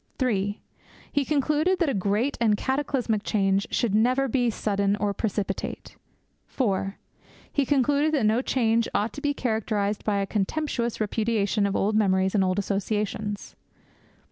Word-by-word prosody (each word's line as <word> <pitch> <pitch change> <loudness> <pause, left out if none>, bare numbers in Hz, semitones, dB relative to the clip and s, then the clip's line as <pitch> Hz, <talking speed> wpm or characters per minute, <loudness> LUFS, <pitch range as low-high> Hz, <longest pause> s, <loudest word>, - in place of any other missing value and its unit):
(3) 205 -5 0 0.5
He 285 - +1
concluded 305 +5 +1
that 340 - +1
a 275 - +1
great 205 +8 0
and 215 -3 +3
cataclysmic 265 -5 -1
change 195 -2 +1
should 230 -5 0
never 250 +5 +3
be 245 -1 +1
sudden 200 -2 0
or 205 -1 -1
precipitate. 200 -2 -3 0.5
(4) 195 -5 -1 0.6
He 280 -3 +1
concluded 290 +2 +2
that 260 -7 +1
no 220 +3 +3
change 230 -3 +1
ought 210 +3 0
to 285 - -7
be 285 -1 0
characterized 215 -4 -1
by 210 -2 0
a 200 - 0
contemptuous 235 +4 -2
repudiation 215 -1 +1
of 200 - -2
old 210 +2 +1
memories 190 -3 +2
and 200 -3 +3
old 185 0 0
associations. 205 +1 -2
215 Hz, 145 wpm, -26 LUFS, 200-260 Hz, 0.6 s, and